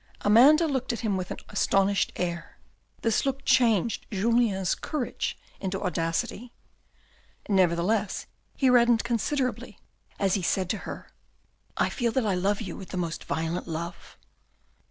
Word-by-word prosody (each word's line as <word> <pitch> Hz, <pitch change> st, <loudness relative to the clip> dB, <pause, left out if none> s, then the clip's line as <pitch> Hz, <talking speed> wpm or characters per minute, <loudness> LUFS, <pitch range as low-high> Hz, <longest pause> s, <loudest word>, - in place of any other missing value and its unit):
Amanda 270 Hz, +10 st, +6 dB
looked 265 Hz, -3 st, -1 dB
at 235 Hz, -, -4 dB
him 215 Hz, -4 st, 0 dB
with 185 Hz, -1 st, -3 dB
an -, -, -5 dB
astonished 195 Hz, -1 st, +2 dB
air. 170 Hz, -1 st, -4 dB, 0.5 s
This 225 Hz, -2 st, +2 dB
look 275 Hz, 0 st, -2 dB
changed 235 Hz, -4 st, +2 dB
Julien's 205 Hz, -2 st, +1 dB
courage 290 Hz, -6 st, -3 dB, 0.2 s
into 190 Hz, 0 st, -3 dB
audacity. 175 Hz, +6 st, -2 dB, 1.0 s
Nevertheless, 190 Hz, +2 st, +1 dB, 0.3 s
he 270 Hz, -, +2 dB
reddened 235 Hz, -2 st, +5 dB
considerably, 240 Hz, -2 st, -2 dB, 0.4 s
as 195 Hz, -2 st, +1 dB
he 195 Hz, -, +1 dB
said 185 Hz, +1 st, 0 dB
to 215 Hz, -, -2 dB
her. -, -, -8 dB, 0.3 s
" -, -, -40 dB, 0.3 s
I -, -, +2 dB
feel 240 Hz, -3 st, -1 dB
that 260 Hz, -4 st, +1 dB
I 205 Hz, -, +1 dB
love 195 Hz, +3 st, 0 dB
you 190 Hz, -6 st, -5 dB
with 190 Hz, -, -10 dB
the 185 Hz, -, -5 dB
most 170 Hz, -2 st, -3 dB
violent 160 Hz, +4 st, -2 dB
love." 170 Hz, +1 st, -6 dB
205 Hz, 145 wpm, -27 LUFS, 180-240 Hz, 1.0 s, Amanda